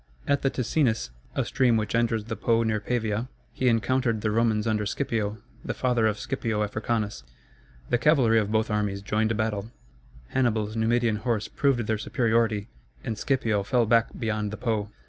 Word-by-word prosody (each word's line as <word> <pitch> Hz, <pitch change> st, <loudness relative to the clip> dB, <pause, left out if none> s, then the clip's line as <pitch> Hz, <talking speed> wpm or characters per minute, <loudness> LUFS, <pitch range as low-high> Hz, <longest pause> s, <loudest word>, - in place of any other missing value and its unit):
At 140 Hz, -1 st, +2 dB
the 135 Hz, -, +2 dB
Ticinus, 120 Hz, -, 0 dB, 0.2 s
a -, -, 0 dB
stream 125 Hz, -4 st, +2 dB
which 105 Hz, -3 st, -2 dB
enters 115 Hz, -2 st, +1 dB
the 115 Hz, +1 st, -5 dB
Po 115 Hz, 0 st, +2 dB
near 110 Hz, -1 st, 0 dB
Pavia, 115 Hz, +1 st, -2 dB, 0.2 s
he 130 Hz, -, 0 dB
encountered 115 Hz, 0 st, +1 dB
the 105 Hz, -, 0 dB
Romans 110 Hz, -1 st, +2 dB
under 110 Hz, -2 st, +1 dB
Scipio, 110 Hz, -2 st, -2 dB, 0.3 s
the -, -, -3 dB
father 120 Hz, -3 st, +2 dB
of 105 Hz, -1 st, 0 dB
Scipio 115 Hz, -6 st, -2 dB
Africanus. 105 Hz, -, -2 dB, 0.7 s
The 120 Hz, -, +3 dB
cavalry 125 Hz, -6 st, +4 dB
of 105 Hz, -1 st, -1 dB
both 110 Hz, 0 st, +1 dB
armies 105 Hz, -2 st, -1 dB
joined 110 Hz, +2 st, 0 dB
battle, 110 Hz, -1 st, -2 dB, 0.6 s
Hannibal's 110 Hz, -4 st, 0 dB
Numidian 115 Hz, 0 st, +2 dB
horse 110 Hz, -1 st, -1 dB
proved 135 Hz, -5 st, +1 dB
their 110 Hz, -1 st, -1 dB
superiority, 110 Hz, -1 st, +1 dB, 0.4 s
and 115 Hz, -, -3 dB
Scipio 110 Hz, -3 st, 0 dB
fell 120 Hz, +4 st, +2 dB
back 115 Hz, +1 st, +4 dB
beyond 105 Hz, -2 st, -1 dB
the 110 Hz, -, -6 dB
Po. 110 Hz, -4 st, -1 dB
110 Hz, 165 wpm, -26 LUFS, 105-120 Hz, 0.7 s, cavalry